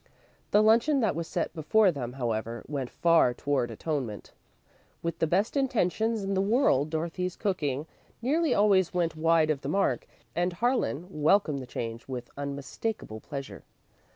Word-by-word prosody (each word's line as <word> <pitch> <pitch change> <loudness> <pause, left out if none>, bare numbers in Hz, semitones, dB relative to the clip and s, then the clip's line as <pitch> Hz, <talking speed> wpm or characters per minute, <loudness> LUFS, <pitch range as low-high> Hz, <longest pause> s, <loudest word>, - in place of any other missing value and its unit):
The 210 - +5
luncheon 235 +7 +4
that 220 -4 +2
was 165 0 -3
set - - -2
before 190 +6 +3
them, 125 -6 -5
however, 115 -2 -3
went 135 -4 -3
far 165 -8 +3
toward 135 -4 0
atonement. 120 -3 -4 0.7
With 170 -1 -3
the 165 - +2
best 195 - +1
intentions 225 -4 +1
in 195 0 -1
the 190 - +2
world, 195 - +3
Dorothy's 170 +3 -2
cooking 150 -8 -1 0.3
nearly 300 +5 +1
always 195 -5 +3
went 170 -2 0
wide 160 0 +3
of 140 -3 -2
the 135 - -4
mark, 195 +5 +1 0.3
and 175 +1 0
Harlan 230 - 0 0.2
welcomed 155 -3 +3
the 130 - -8
change 115 -1 -5
with 125 -2 -6
unmistakable 140 - -4
pleasure. 140 +3 -7
165 Hz, 155 wpm, -28 LUFS, 140-205 Hz, 0.7 s, The